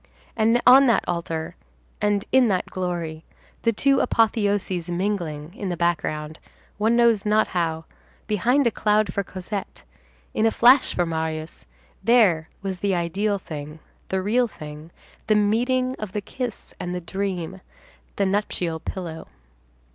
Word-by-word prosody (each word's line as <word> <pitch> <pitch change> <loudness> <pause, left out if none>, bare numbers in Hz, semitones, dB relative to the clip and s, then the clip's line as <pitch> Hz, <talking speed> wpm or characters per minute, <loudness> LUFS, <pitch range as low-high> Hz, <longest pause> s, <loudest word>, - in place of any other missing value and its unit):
And 230 +2 +3
on 265 +2 +8
that 230 -4 +3
altar, 165 -2 -3 0.5
and 205 -1 +1
in 260 -1 +5
that 190 -4 +1
glory, 170 -3 -4 0.4
the 230 - +2
two 275 +5 +2
apotheoses 205 -6 +1
mingling, 175 -4 -2
in 200 -2 -5
the 175 - -3
background, 155 -2 -1 0.4
one 220 +3 +3
knows 235 -4 +4
not 215 +1 +2
how, 165 -2 -1 0.4
behind 240 +7 +2
a 235 - +3
cloud 210 -4 +1
for 200 - -1
Cosette, 190 +2 -6 0.5
in 220 - +2
a - - +5
flash 250 +4 +5
for 175 - +1
Marius, 160 - -4 0.4
there 205 -10 +4
was 190 -2 -3
the 200 -1 +1
ideal 195 +5 0
thing, 150 -4 -8 0.3
the 190 0 -1
real 240 +5 +2
thing, 150 -4 -10 0.4
the 215 - +4
meeting 250 +5 +1
of 215 -3 -6
the 210 - -2
kiss 245 +3 -6
and 180 0 -4
the 180 - -4
dream, 190 0 -4 0.5
the 200 - +1
nuptial 190 -4 -1
pillow. 165 -2 -6
195 Hz, 145 wpm, -24 LUFS, 170-220 Hz, 0.5 s, on